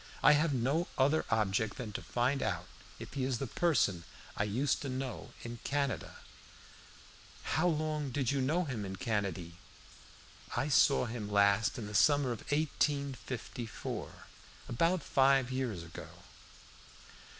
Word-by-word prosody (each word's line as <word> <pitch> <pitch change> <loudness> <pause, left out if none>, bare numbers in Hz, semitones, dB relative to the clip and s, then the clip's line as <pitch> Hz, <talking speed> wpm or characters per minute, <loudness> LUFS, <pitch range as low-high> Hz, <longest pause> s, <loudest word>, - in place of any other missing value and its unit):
I - - +9
have 150 +2 +3
no 140 +7 +1
other 145 +4 +3
object 110 -1 +1
than 115 -4 -5
to - - -4
find 130 +3 0
out - - -1 0.3
if - - -9
he 135 - -2
is 130 -2 0
the 135 - -3
person 120 - +1 0.3
I 105 - 0
used 125 +7 0
to 140 - -4
know 130 0 -4
in 120 0 -6
Canada." 140 -1 -1 1.3
"How 160 +3 +1
long 155 -2 0
ago 130 - -5
did 135 -3 +1
you 140 -1 0
know 155 +7 +1
him 125 -8 -3
in 95 -1 -5
Canady?" 95 -6 -2 1.1
"I 135 +5 0
saw 140 -1 +5
him 110 -3 -5
last 100 +4 +3
in 115 - -4
the 105 - -7
summer 145 +4 +4
of 115 - -4
1854 140 -6 -2 0.6
about 165 +7 +1
five 135 -1 +3
years 125 -9 -2
ago." 85 - -9
130 Hz, 145 wpm, -33 LUFS, 110-145 Hz, 1.3 s, I